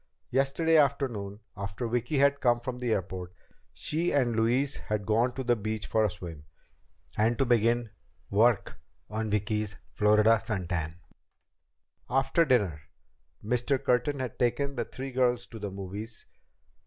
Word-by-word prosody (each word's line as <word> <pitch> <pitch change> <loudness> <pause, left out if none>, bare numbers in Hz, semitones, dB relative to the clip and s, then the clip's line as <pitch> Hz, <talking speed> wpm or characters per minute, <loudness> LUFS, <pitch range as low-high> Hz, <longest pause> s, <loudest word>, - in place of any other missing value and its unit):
Yesterday 140 +5 +3
afternoon, 120 -8 0
after 100 +4 -4
Vicki 120 +5 -1
had 140 +1 +3
come 120 -2 +3
from 125 +1 -5
the 125 -2 -1
airport, 95 -3 -2 0.4
she 165 +3 -1
and 125 -5 +2
Louise 125 +5 +1
had 105 -1 -3
gone 115 +4 +2
to 130 - -4
the 120 -1 +3
beach 110 0 -3
for 110 - +2
a 105 - +3
swim 85 -5 -8 0.8
and 115 +2 +3
to 135 - +2
begin 120 -1 +2 0.4
"work" 110 +1 +2 0.3
on 110 0 -2
Vicki's 105 0 -1 0.2
Florida 105 +1 +4
sun 95 -5 -3
tan. 80 -2 -2 1.1
After 135 +6 +3
dinner, 100 - +2 0.6
Mr. 125 +4 +1
Curtin 130 +3 +1
had 130 -4 -5
taken 135 +3 +1
the 120 - -1
three 135 +1 -7
girls 125 -1 +1
to 115 - -10
the 100 -1 -4
movies. 100 +4 -7
115 Hz, 145 wpm, -29 LUFS, 105-130 Hz, 1.1 s, Florida